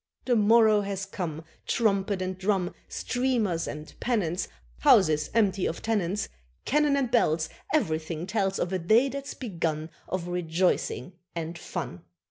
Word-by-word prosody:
The 245 - +3
morrow 220 -1 +5
has 195 -1 -3
come; 165 -5 -5 0.2
Trumpet 200 -3 +1
and 185 0 -3
drum, 190 -1 0
Streamers 240 -9 0
and 150 +1 -7
pennants, 185 -8 0 0.3
Houses 155 - +5
empty 200 -4 +2
of 165 - -5
tenants, 205 -3 0 0.4
Cannon 295 0 +3
and 260 -4 0
bells, 160 -9 +2 0.2
Everything 160 - 0
tells 195 -1 0
Of 175 +2 -1
a 185 - +1
day 220 +10 +4
that's 275 +1 -5
begun 165 - -3 0.2
Of 185 -2 -3
rejoicing 180 +1 0 0.2
and 165 0 -4
fun. 90 - -5
190 Hz, 135 wpm, -27 LUFS, 170-225 Hz, 0.4 s, morrow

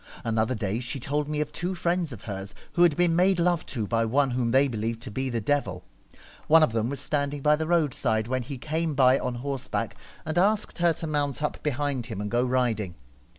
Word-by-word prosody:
Another 115 +2 0
day 105 0 -2
she 125 +3 -4
told 145 +3 -2
me 150 0 -1
of 150 0 -3
two 175 +5 -3
friends 170 -2 0
of 115 -5 -9
hers 95 -1 -6 0.2
who 175 - +1
had 170 -4 +5
been 175 -2 +3
made 180 +1 +3
love 175 -1 +1
to 115 -6 -3
by 115 +2 +1
one 135 +4 +2
whom 120 -1 0
they 135 +4 +4
believed 115 -1 -3
to - - -7
be 130 +5 -1
the 120 -2 -1
devil. 105 -7 -1 0.6
One 160 +1 +7
of 155 - +3
them 115 +1 0
was 140 - -4
standing 140 -1 -1
by 150 0 +5
the 160 +1 -3
road 165 -5 +2
side 110 -3 0
when 130 +1 -1
he 135 +3 -6
came 155 +3 -2
by 130 0 +5
on 125 -1 -3
horseback, 135 +1 -3 0.3
and 155 +2 0
asked 205 0 +1
her 170 -1 +4
to 165 - -5
mount 145 -2 -1
up 150 - -2
behind 145 -3 -1
him, 110 -5 -5
and 105 0 -4
go 120 +1 +2
riding. 120 -7 0
135 Hz, 230 wpm, -26 LUFS, 115-155 Hz, 0.6 s, One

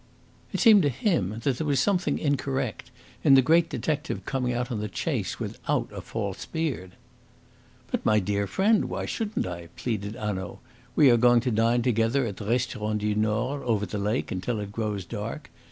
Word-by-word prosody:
It - - -2
seemed 220 -5 +7
to 145 - +2
him 120 - 0
that 135 -4 +1
there 155 - -1
was 140 -3 +2
something 190 +6 +1
incorrect 135 -4 -2 0.3
in 135 - +7
the 135 - +7
great 165 +4 +4
detective 150 -2 -2
coming 130 -2 -1
out 125 +1 -2
on 115 - -2
the 105 - -2
chase - - -2
without - - -2
a - - -6
false - - -4
beard. 140 - -3 1.0
"But, - - -1
my 105 -1 +4
dear 100 +1 -1
friend, 205 - +2
why - - -3
shouldn't 220 -1 -2
I?" 85 -2 -6
pleaded 105 -3 -3
Hanaud. 95 -4 -4 0.4
"We 140 -4 +7
are 120 - +5
going 120 0 +5
to 125 - -1
dine 115 +2 +2
together 120 +2 +2
at 100 -4 -5
the 105 - -7
Restaurant 110 -2 -1
du 105 0 +1
Nord, 110 +6 0
over 110 -5 0
the 105 +2 -4
lake, 105 +5 -1
until 100 +5 -2
it 100 -1 -5
grows 105 -3 -3
dark. - - -6
120 Hz, 185 wpm, -26 LUFS, 105-135 Hz, 1.0 s, seemed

